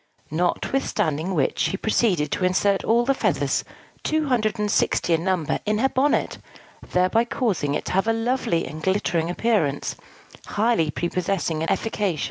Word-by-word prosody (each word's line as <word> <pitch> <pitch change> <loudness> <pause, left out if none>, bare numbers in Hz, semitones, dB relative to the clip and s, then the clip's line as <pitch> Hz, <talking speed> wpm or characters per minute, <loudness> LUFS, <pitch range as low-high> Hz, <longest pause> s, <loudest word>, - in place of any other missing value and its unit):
Notwithstanding 175 - -1
which, 145 - 0
she 195 - +1
proceeded 190 -8 +1
to - - -1
insert 190 +2 +2
all 235 +2 +3
the 275 - +3
feathers - - 0 0.4
two 310 -1 0
hundred 230 -3 +1
and 210 -1 -1
sixty 170 - +2
in 165 0 +1
number 185 -5 0
in 210 0 0
her 265 +5 +2
bonnet; 275 +3 +1 0.5
thereby 185 +6 +2
causing 190 - -1
it - - -3
to - - -4
have 195 +3 +1
a - - +4
lovely 225 -7 0
and 155 +3 -7
glittering 175 -3 0
appearance, 180 -8 0 0.5
highly 210 -7 +1
prepossessing 175 -1 -1
and 165 - -1
efficacious. 205 -7 -1
195 Hz, 155 wpm, -23 LUFS, 165-225 Hz, 0.5 s, a